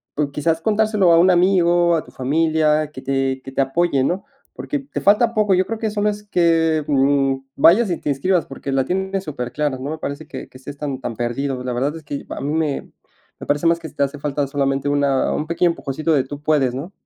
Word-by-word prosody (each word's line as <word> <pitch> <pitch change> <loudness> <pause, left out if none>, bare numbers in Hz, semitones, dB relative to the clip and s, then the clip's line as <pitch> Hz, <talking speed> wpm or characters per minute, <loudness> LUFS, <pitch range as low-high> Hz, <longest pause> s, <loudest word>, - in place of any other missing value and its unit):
O 145 -1 0
quizás 160 +3 0
contárselo 215 -4 +2
a 165 - +6
un 185 +2 +5
amigo, 175 -1 +3
a 160 - -1
tu - - -16
familia, 155 +2 +1
que 130 - -9
te 135 -1 -1
que 135 - -8
te 135 - 0
apoye, 135 0 +1
¿no? 180 +8 -1 0.3
Porque 290 - -4
te 275 +1 -6
falta 215 +4 +4
poco, 210 -4 +3
yo 185 +1 +2
creo 225 +2 -4
que 220 - -1
solo 210 0 0
es 210 0 -4
que, 165 -5 +2
mm, 135 -1 +2 0.2
vayas 190 +10 +5
y 170 - 0
te - - -4
inscribas, 170 +5 +1
porque 135 0 -6
la 135 -1 +1
tienes 190 +1 -2
superclara. 145 0 -3
No 135 +2 -5
me 160 - -4
parece 145 +1 -5
que - - -8
que - - -14
estés 140 +2 -9
tan 140 -3 -4
tan 115 - -4
perdido. 125 +3 -2
La 125 -1 -3
verdad 140 +5 -1
es 160 - -9
que 145 -1 -6
a - - -5
mí 145 +2 -2
me 155 -3 -2 0.5
me - - -9
parece 145 +3 0
más 170 0 +3
que 160 - -8
te 145 -2 -1
hace 140 +1 -3
falta 145 0 -1
solamente 140 0 -1
una 140 -2 +1
un 155 - -3
pequeño 170 +1 +2
empujoncito 155 +1 -2
de: 135 -4 +3
"Tú 145 +2 -8
puedes", 145 -5 +2
¿no? 150 +9 -6
150 Hz, 230 wpm, -20 LUFS, 135-175 Hz, 0.5 s, a